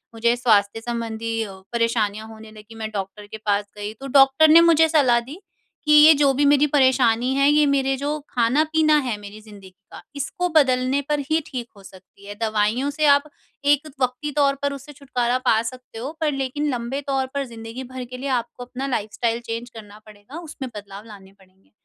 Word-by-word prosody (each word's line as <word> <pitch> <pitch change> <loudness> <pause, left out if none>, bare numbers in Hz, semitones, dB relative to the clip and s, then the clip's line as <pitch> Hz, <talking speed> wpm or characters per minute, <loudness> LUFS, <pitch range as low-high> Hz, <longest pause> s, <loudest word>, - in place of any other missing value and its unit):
मुझे 235 +1 +2
स्वास्थ्य 220 -3 +2
संबंधी 230 -1 -4
अ, 195 -2 -8 0.2
परेशानियाँ 220 -2 -1
होने 220 0 -13
लगी 215 +1 -14
मैं 220 -1 -5
डॉक्टर 195 +1 -6
के 220 - -8
पास 205 0 +1
गई 205 +1 -5
तो 275 - -7
डॉक्टर 270 +3 +5
ने 330 +2 +8
मुझे 325 -1 +5
सलाह 255 -7 +3
दी 285 - -10 0.4
कि 300 - +1
ये 305 +1 +9
जो 280 -2 +4
भी 285 +2 +1
मेरी 290 +1 +4
परेशानी 260 -3 +2
है 275 +1 +4
ये 300 0 +4
मेरे 270 -1 +1
जो 295 +2 -3
खाना-पीना 305 +6 +2
है 250 -6 -2
मेरी 205 +1 -11
ज़िंदगी 205 -3 -14 0.2
का, - - -10
इसको 330 +5 -3
बदलने 260 -1 +3
पर 295 -1 +1
ही 315 +1 +2
ठीक 245 -2 -6
हो 195 - -16
सकती 190 +1 -17
है। 205 - -7
दवाइयों 220 +5 0
से 305 +1 -1
आप 285 +1 +4 0.4
एक 290 +1 +2
वक़्ती 255 +4 -1
तौर 280 -1 +3
पर 285 0 -1
उससे 275 +1 -10
छुटकारा 250 -3 -1
पा 220 0 +3
सकते 250 -1 -8
हो 270 +5 -5
पर 305 -2 +1
लेकिन 275 +2 -2
लंबे 250 +2 -3
तौर 270 -1 0
पर 280 -1 -2
ज़िंदगी 230 +2 -9
भर 255 0 -8
के 250 +1 -9
लिए 275 +2 -5
आपको 240 +1 -10
अपना 260 +2 -6
लाइफ्स्टाइल 230 0 -2
चेंज 235 +1 -6
करना 215 -2 -13
पड़ेगा, 215 +8 -13
उसमें 295 -6 -8
बदलाव 205 +1 -10
लाने 195 -2 -14
पड़ेंगे। 190 0 -27
250 Hz, 200 wpm, -22 LUFS, 220-280 Hz, 0.4 s, ये